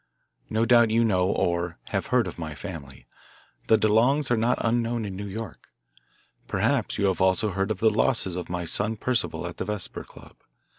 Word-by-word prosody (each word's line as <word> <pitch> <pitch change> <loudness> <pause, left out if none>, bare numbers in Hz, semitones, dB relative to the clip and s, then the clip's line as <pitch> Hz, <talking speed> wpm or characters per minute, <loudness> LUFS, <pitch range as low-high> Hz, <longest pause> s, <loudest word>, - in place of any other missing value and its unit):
No 110 +1 +1
doubt 120 -1 +5
you 115 +1 +3
know 95 -4 +2
or 85 -2 -1
have - - -2
heard - - +2
of - - -7
my 80 -2 -5
family 70 -3 -9 0.6
the 110 - +5
DeLongs 125 +7 +2
are - - +5
not 115 +2 +1
unknown 115 0 0
in 95 -2 -5
New 100 +2 -5
York. 110 +2 -7 0.8
Perhaps - - 0
you 100 - +1
have 95 -1 0
also 95 +3 +2
heard 95 +2 -1
of 110 - -1
the 110 +2 +3
losses 105 -4 +1
of 90 - -5
my 90 0 -3
son 105 +6 0
Percival 125 +3 -1
at - - -6
the - - -3
Vesper 105 -3 -3
Club. - - -16
105 Hz, 190 wpm, -26 LUFS, 90-115 Hz, 0.8 s, doubt